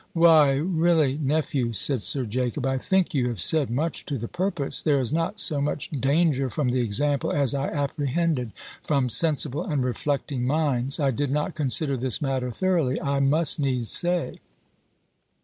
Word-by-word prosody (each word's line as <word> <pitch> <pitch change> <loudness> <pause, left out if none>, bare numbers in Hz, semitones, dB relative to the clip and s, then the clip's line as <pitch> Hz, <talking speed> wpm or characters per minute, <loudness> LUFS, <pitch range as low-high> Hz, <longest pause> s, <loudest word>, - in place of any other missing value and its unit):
"Why, 160 -4 +5
really, 160 -2 +1
nephew," 140 -4 -1
said 125 +4 +1
Sir 125 +8 0
Jacob, 125 +4 -2
"I 135 0 0
think 190 +4 0
you 130 -4 +1
have 120 -5 -4
said 145 - +2
much 150 +7 -2
to 140 - -2
the 115 0 -5
purpose. 175 -4 -1
There 145 -3 +2
is 125 -1 -1
not 165 +1 -1
so 145 -2 +1
much 150 +1 -3
danger, 140 -1 +1
from 135 +1 -1
the 125 +1 0
example, 140 +5 0
as 140 -3 +1
I 140 0 -1
apprehended, 145 -2 -1 0.3
from 140 -4 0
sensible 150 +3 +1
and 145 -7 -1
reflecting 135 0 -2
minds. 140 -3 0
I 140 -2 +2
did 140 +3 -2
not 150 +2 -1
consider 140 -1 0
this 125 -1 0
matter 135 -3 -2
thoroughly, 165 -1 0
I 140 0 -1
must 150 +4 +2
needs 130 -5 -1
say." 175 0 -1
140 Hz, 165 wpm, -24 LUFS, 130-155 Hz, 0.3 s, Why